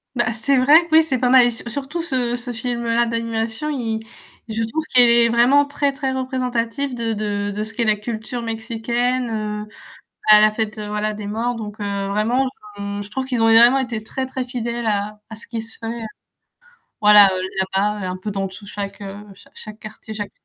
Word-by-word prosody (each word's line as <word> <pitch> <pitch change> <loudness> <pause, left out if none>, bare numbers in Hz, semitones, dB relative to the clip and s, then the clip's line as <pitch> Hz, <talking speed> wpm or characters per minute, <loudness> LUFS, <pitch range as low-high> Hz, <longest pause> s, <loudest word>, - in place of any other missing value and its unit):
Bah 240 -1 0
c'est 240 +5 +1
vrai 255 +4 +4
que 315 - +1
oui 320 - +8
c'est 270 -5 -1
pas 250 - +2
mal 255 -1 +7
et 240 - +2
sur 235 +1 -5
surtout 280 +7 -4
ce 255 -7 -1
ce 245 0 -4
film-là 235 0 -1
d'animation 230 +3 -2
il 230 -6 -2 0.5
je 225 0 -2
trouve 270 +8 -2
qu'il 250 -1 +6
est 235 0 +5
vraiment 245 +5 +4
très 285 0 -1
très 270 -1 -2
représentatif 255 0 -2
de 230 -1 -1
de 205 -1 -2
de 210 - -2
ce 220 +1 -7
qu'est 235 - -1
la 215 -2 +3
culture 220 +3 -5
mexicaine, 235 +2 -2
heu, 210 -1 -4 0.6
à 210 0 +9
la 215 0 +5
fête 215 -1 -3
voilà 210 0 -2
des 210 -1 -7
morts 230 +4 -2
donc, 215 -1 -7
heu, 200 -1 -2
vraiment 225 +6 +1 0.3
et 200 0 -4
je 205 - -11
trouve 265 +3 -3
qu'ils 250 -3 -1
ont - - +4
vraiment 235 +4 +7
été 235 -5 -3
très 265 +4 -4
très 260 0 -4
fidèles 240 -1 -4
à 210 0 -2
à - - -7
ce 220 - -14
qui 230 -1 -4
se 225 0 -10
fait, 230 +1 -5 1.0
voilà 210 -1 +8 0.4
là-bas 205 0 0
un 180 - -4
peu 190 +3 -6
dans 195 -1 -2
tous 190 +2 -10
chaque, 200 -1 -6
heu, 200 +1 -8
chaque 195 - -20
chaque 215 0 -10
quartier, 215 +1 -10
chaque 205 -1 -5
230 Hz, 205 wpm, -20 LUFS, 210-245 Hz, 1.0 s, à